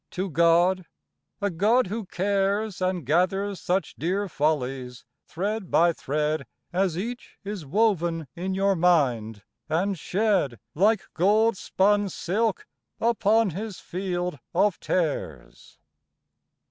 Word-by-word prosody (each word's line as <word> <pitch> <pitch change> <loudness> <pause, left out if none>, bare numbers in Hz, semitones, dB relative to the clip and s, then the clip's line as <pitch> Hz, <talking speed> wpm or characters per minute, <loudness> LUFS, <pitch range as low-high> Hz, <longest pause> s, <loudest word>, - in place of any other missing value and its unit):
to 185 0 -4
God, 170 +3 +3 0.5
a 200 -1 0
God 215 +9 +3
who 210 +1 -5
cares, 200 +2 0
And 185 -4 -1
gathers 185 +6 +1
such 185 +2 -1
dear 190 +5 -1
follies 135 -6 -2 0.2
thread 200 +2 -3
by 170 0 +4
thread 150 -1 -2 0.3
As 185 -2 +1
each 235 +6 -6
is 200 -7 -6
woven 175 -3 +1
in 185 +2 -3
your 195 0 +2
mind, 125 - +2 0.3
and 180 +4 0
shed 190 - 0
Like 205 +5 +3
gold 210 +6 +3
spun 205 +2 +1
silk 205 +5 -1 0.3
upon 225 -2 +2
His 205 +3 -6
field 180 -3 -3 0.2
of 195 +1 +2
tares? 165 -5 -3
185 Hz, 115 wpm, -26 LUFS, 165-205 Hz, 0.5 s, by